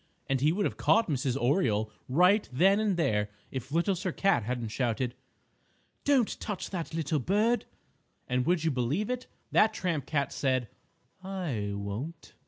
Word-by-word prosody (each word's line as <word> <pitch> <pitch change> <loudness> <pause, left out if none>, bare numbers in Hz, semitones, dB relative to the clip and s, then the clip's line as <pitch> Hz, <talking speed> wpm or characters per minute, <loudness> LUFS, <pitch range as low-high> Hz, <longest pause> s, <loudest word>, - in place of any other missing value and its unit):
And 135 -1 0
he 150 +2 +4
would 200 +4 0
have - - -2
caught 225 - +3
Mrs. 135 -3 0
Oriole 120 - +1 0.2
right 180 +9 +4
then 190 +10 +4
and 210 -4 +1
there 105 -10 +1 0.2
if 130 0 -5
Little 170 +5 +2
Sir 185 0 -2
Cat 195 -6 +2
hadn't 120 +1 -3
shouted: 120 +1 -1 0.9
"Don't 270 -6 +2
touch 210 -4 -4
that 170 -3 -4
little 155 -1 0
bird!" 210 - +2 0.6
And 125 -1 +1
would 175 -2 +2
you 160 - +2
believe 140 - 0
it? 250 0 -4 0.2
That 215 - +4
tramp 165 -7 -2
cat 140 -3 0
said, 130 -4 0 0.5
"I 155 - -3
won't!" 110 +12 -6
155 Hz, 160 wpm, -29 LUFS, 125-190 Hz, 0.9 s, he